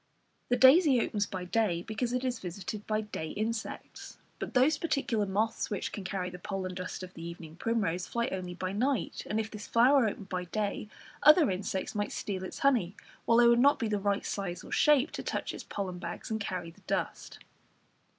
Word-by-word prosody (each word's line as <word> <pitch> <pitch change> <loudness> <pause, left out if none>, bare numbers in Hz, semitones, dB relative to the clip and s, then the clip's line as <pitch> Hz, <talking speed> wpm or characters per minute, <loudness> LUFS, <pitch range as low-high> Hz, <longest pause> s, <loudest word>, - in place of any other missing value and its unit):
The 245 - +3
daisy 265 +1 +7
opens 205 -2 0
by 185 -2 -5
day, 180 -3 +1
because 225 +2 -2
it 250 +1 -1
is 250 -2 -1
visited 195 +2 -6
by 215 0 +1
day 210 -7 -5
insects, 220 +1 -4 0.2
but - - -5
those 265 +5 +4
particular 240 -10 0
moths 210 +4 0
which 205 - -3
can 200 - -6
carry 180 0 -3
the 180 - -9
pollen 190 -1 -4
dust 185 0 -5
of 185 0 -9
the 165 - -10
evening 165 -1 -8
primrose, 185 -5 -1
fly 235 0 -1
only 180 -1 -4
by 185 +1 -3
night, 250 +5 0
and 215 - 0
if 220 0 -3
this 210 -1 -8
flower 250 +1 +5
opened 200 -1 -5
by 180 -1 -2
day 210 +2 -2 0.3
other 300 - +7
insects 190 0 -3
might 205 -1 -2
steal 190 -2 -3
its 185 - -6
honey, 220 -9 +3 0.3
while 230 - +4
they 240 0 +7
would 235 0 +5
not 285 +3 +5
be 230 - -1
the 210 -1 0
right 200 0 0
size 185 -3 -3
or - - -11
shape 295 0 +4
to - - -5
touch - - -3
its - - -7
pollen 185 -3 -4
bags 185 - -6
and 220 - 0
carry 180 -4 -4
the - - -22
dust. - - -3
210 Hz, 205 wpm, -30 LUFS, 185-235 Hz, 0.3 s, daisy